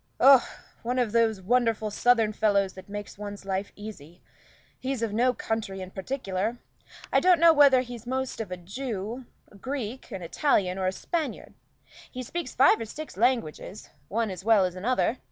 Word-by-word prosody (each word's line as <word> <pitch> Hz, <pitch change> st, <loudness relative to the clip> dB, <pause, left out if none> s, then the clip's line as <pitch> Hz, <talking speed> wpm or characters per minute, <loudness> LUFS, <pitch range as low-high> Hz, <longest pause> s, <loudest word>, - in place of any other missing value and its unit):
"Oh, 270 Hz, -2 st, +8 dB, 0.4 s
one 245 Hz, +2 st, -2 dB
of 245 Hz, -4 st, +1 dB
those 220 Hz, -4 st, +2 dB
wonderful 225 Hz, -1 st, +1 dB
southern 225 Hz, 0 st, +3 dB
fellows 200 Hz, -3 st, +2 dB
that 190 Hz, +1 st, -12 dB
make 205 Hz, 0 st, -5 dB
one's 205 Hz, -1 st, -7 dB
life 195 Hz, +1 st, -2 dB
easy. 180 Hz, -6 st, -11 dB, 0.6 s
He's 260 Hz, -2 st, -3 dB
of 220 Hz, -3 st, -2 dB
no 245 Hz, +4 st, +3 dB
country 220 Hz, -5 st, -3 dB
in 185 Hz, 0 st, -7 dB
particular. 210 Hz, 0 st, -3 dB, 0.6 s
I -, -, +6 dB
don't 360 Hz, -2 st, +4 dB
know 335 Hz, 0 st, +7 dB
whether 280 Hz, -4 st, +6 dB
he's 245 Hz, -2 st, -9 dB
most 260 Hz, -2 st, -2 dB
of 215 Hz, -, -6 dB
a 180 Hz, -, -5 dB
Jew, 220 Hz, +4 st, -5 dB, 0.2 s
a -, -, -17 dB
Greek, 255 Hz, +1 st, -5 dB
an 195 Hz, -6 st, -6 dB
Italian, 190 Hz, -, +1 dB
or 185 Hz, -, 0 dB
a -, -, +2 dB
Spaniard. 320 Hz, -, -4 dB, 0.6 s
He 255 Hz, -1 st, -6 dB
speaks 335 Hz, +2 st, -5 dB
five 260 Hz, -2 st, +5 dB
or -, -, -3 dB
six 305 Hz, +8 st, -8 dB
languages, 225 Hz, -4 st, -1 dB, 0.2 s
one 225 Hz, 0 st, -1 dB
as 185 Hz, 0 st, -7 dB
well 215 Hz, -3 st, +5 dB
as 180 Hz, -, -3 dB
another. 240 Hz, +6 st, 0 dB
225 Hz, 175 wpm, -27 LUFS, 195-255 Hz, 0.6 s, Oh